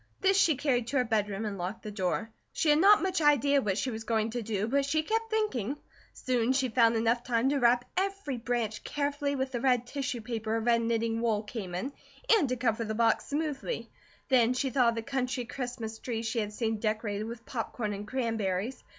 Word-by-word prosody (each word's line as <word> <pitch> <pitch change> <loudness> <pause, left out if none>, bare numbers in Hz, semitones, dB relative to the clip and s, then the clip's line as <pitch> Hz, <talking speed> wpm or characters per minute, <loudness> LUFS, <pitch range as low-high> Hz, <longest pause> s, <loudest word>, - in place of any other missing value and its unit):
This 390 0 +3
she 340 -5 +4
carried 250 -4 0
to 275 - -1
her 255 - +4
bedroom 210 -2 -1
and 200 -3 -4
locked 180 +5 -4
the 215 - -5
door. 200 +2 -2 0.2
She 310 - +2
had 295 - +4
not 405 +3 +6
much 375 -3 0
idea 285 -1 +4
what 200 -5 -1
she 255 +5 -1
was 225 0 -5
going 220 0 0
to 240 +1 -3
do, 215 -1 -2
but 280 +4 +2
she 310 +3 +1
kept 450 +5 -1
thinking. 295 - -1 0.4
Soon 250 -1 0
she 265 -1 +1
found 230 -1 +4
enough 230 +2 +1
time 245 +1 +1
to 285 0 +1
wrap 245 0 +4
every 390 -8 -1
branch 230 -2 -2
carefully 285 0 -1
with 265 0 -2
the 240 -2 -3
red 250 -2 +2
tissue 270 -2 -3
paper 220 -1 -3
her 225 - +1
red 230 +1 +2
knitting 230 0 0
wool 220 -3 +1
came 210 -5 -6
in, 260 +10 -3 0.4
and 325 - +2
to 255 - 0
cover 230 -1 0
the 220 0 -3
box 230 0 +2
smoothly. 300 - -3 0.4
Then 250 -2 +4
she 265 +1 0
thought 250 -3 +4
of 230 - -2
the 230 - -3
country 255 -1 -2
Christmas 240 -3 -5
trees 230 -2 -3
she 225 +1 -1
had 210 -1 -2
seen 220 0 -2
decorated 215 -1 -1
with 230 +1 -8
popcorn 225 -3 -3
and 205 +1 -6
cranberries. 225 -2 -2
240 Hz, 215 wpm, -29 LUFS, 220-275 Hz, 0.4 s, not